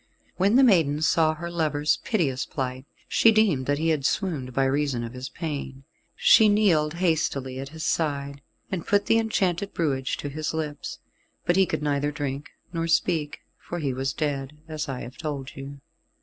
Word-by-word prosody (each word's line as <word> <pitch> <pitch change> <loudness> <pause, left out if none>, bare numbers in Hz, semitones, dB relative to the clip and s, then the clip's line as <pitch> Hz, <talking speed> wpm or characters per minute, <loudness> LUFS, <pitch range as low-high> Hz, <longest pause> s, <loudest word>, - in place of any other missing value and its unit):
When 195 +5 +3
the 270 - +7
maiden 160 - +4
saw 155 0 +3
her 170 +2 -6
lover's 150 -3 +1
piteous 145 - -1
plight, 130 -1 -4 0.2
she 225 - +5
deemed 200 -12 +2
that 145 0 +2
he 165 +2 0
had 155 -3 +1
swooned 145 -6 -1
by 135 +2 +1
reason 135 -3 0
of 115 +1 -6
his 130 +1 -6
pain. 140 -5 -5 0.3
She 220 -1 +6
kneeled 170 -7 +3
hastily 150 -7 0
at 135 0 -6
his 160 +1 -6
side, 140 -3 -1 0.3
and 180 -4 -3
put 205 0 +3
the 225 - +4
enchanted 200 -4 0
brewage 135 -5 0
to 145 - -5
his 155 +2 -3
lips, 150 -2 -4 0.5
but 175 - +3
he 190 -1 +4
could 155 -1 -2
neither 145 0 0
drink 145 -2 -4 0.2
nor 165 0 -1
speak, 160 -2 0 0.2
for 175 - -6
he 140 -6 -1
was 135 +1 -1
dead, 145 -1 -3
as 155 -2 -4
I 130 -2 -4
have 125 - -9
told 145 -4 -5
you. 135 +1 -8
150 Hz, 180 wpm, -25 LUFS, 135-170 Hz, 0.5 s, the